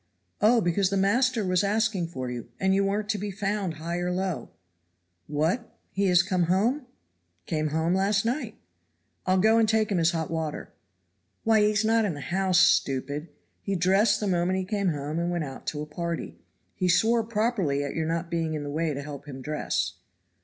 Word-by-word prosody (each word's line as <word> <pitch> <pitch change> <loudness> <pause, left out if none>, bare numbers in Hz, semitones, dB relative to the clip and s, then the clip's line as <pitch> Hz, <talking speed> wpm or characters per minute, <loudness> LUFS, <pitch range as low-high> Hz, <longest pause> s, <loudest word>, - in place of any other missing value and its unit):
"Oh, 225 +3 +5
because 180 +1 +1
the 200 - 0
master 230 +3 +2
was 185 0 +2
asking 205 -3 +1
for 130 -6 -5
you, 120 -1 -6
and 190 0 +2
you 195 +1 +2
weren't 205 +2 -1
to 210 -1 0
be 205 +1 -3
found 195 -3 -2
high 165 +3 -4
or 175 0 -1
low." 180 -7 -2 0.8
"What, 160 +11 -1 0.2
is 190 -2 +4
he - - -11
come 180 -3 +2
home?" 230 - +1 0.6
"Came 155 -1 -1
home 160 +3 0
last 195 +2 +2
night." 250 +6 -2 0.7
"I'll 185 +1 +3
go 220 +4 +4
and 220 -1 +3
take 220 -1 +2
him 190 - +2
his 165 0 +4
hot 165 -2 -2
water." 160 -2 -4 0.7
"Why, 220 -1 +4
he 210 0 +4
is 215 0 +1
not 225 +1 +3
in 190 -7 -1
the - - -7
house, 185 +3 +1
stupid. 145 +4 +2 0.3
He 195 - -2
dressed 195 +4 +3
the 210 - -2
moment 180 -1 +1
he 190 - -2
came 200 0 -1
home 150 0 -2
and 170 0 -1
went 175 -2 -1
out 135 -2 -8
to 150 -1 -2
a - - -6
party. 170 +2 -5 0.3
He 185 -1 -1
swore 225 +6 +3
properly 210 - 0
at 140 - -4
your 160 -1 -2
not 165 +1 -2
being 165 -2 -1
in 150 - -4
the 145 - -5
way 155 0 -1
to 140 - -5
help 145 0 -8
him 135 -2 -7
dress." 150 +3 -2
185 Hz, 205 wpm, -27 LUFS, 160-210 Hz, 0.8 s, Oh